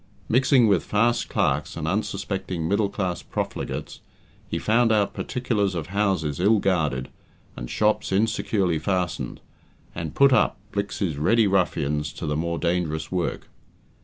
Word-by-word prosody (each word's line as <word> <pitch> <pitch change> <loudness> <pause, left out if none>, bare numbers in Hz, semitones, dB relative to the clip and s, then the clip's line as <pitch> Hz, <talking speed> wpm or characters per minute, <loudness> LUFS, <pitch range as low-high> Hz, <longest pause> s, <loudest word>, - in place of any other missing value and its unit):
Mixing 130 +1 +4
with 100 -5 +3
fast 115 +3 +1
clerks 75 +4 0
and 80 -1 -3
unsuspecting 95 -3 -2
middle 100 +1 +1
class 95 -4 -2
profligates, - - -4 0.5
he - - -1
found 115 +1 +3
out 105 -2 +2
particulars 105 -7 -1
of 85 +3 -5
houses 95 -8 0
ill 105 +5 +4
guarded, 75 -10 0 0.5
and - - -7
shops 105 -2 +1
insecurely 100 -4 +1
fastened, 90 +1 -2 0.5
and 80 -3 -5
"put 140 -1 +6
up" - - +3
Blicks's 100 -6 -2
ready 110 +10 +3
ruffians 75 -6 0
to - - -6
the 75 -1 -1
more 85 +2 -1
dangerous 85 -2 -1
work. 90 -2 -2
95 Hz, 135 wpm, -24 LUFS, 80-105 Hz, 0.5 s, put